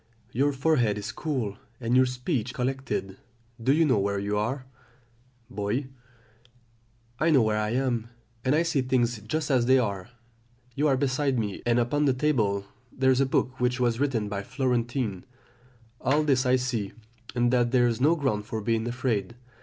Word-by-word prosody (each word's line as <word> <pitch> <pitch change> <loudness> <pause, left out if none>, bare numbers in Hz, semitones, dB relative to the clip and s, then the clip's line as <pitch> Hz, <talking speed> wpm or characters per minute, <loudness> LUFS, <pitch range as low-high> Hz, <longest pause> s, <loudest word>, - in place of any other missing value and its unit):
Your 140 +4 +2
forehead 135 -7 +1
is 105 +2 -4
cool, 125 -10 -3 0.2
and 120 0 0
your 130 0 +5
speech 125 -1 -2
collected. 125 -7 -3 0.4
Do 130 - +2
you 160 +3 +4
know 130 -8 +3
where 100 0 0
you 100 +1 -2
are? 125 +6 -2 0.8
"Boy. 105 +7 -2 1.3
I 165 - +3
know 140 -7 +5
where 110 -1 +1
I 105 0 -1
am, 125 -4 0 0.4
and 130 +3 +2
I 165 - +3
see 165 -5 +1
things 120 -3 +1
just 150 +8 -2
as 125 -3 +3
they 130 +1 +6
are; 100 -5 -2 0.6
you 145 +5 +1
are 135 -2 +3
beside 135 0 0
me, 105 -4 -3
and 120 0 +3
upon 135 +5 +1
the 135 - +3
table 110 -9 +1 0.3
there 130 0 +2
is 130 +1 +3
a 135 - +2
book 130 0 0
which 125 0 +1
was 120 -1 +1
written 130 -7 0
by 100 -1 -3
a - - -6
Florentine. 120 -4 -1 0.8
All 145 +3 +2
this 135 -3 +2
I 125 - +5
see, 125 -6 -2 0.4
and 120 0 +2
that 120 -1 +3
there 125 -1 +3
is 120 0 0
no 155 +5 +5
ground 110 -9 -1
for 110 - -3
being 115 +1 0
afraid. 120 -3 -2
125 Hz, 180 wpm, -27 LUFS, 110-135 Hz, 1.3 s, they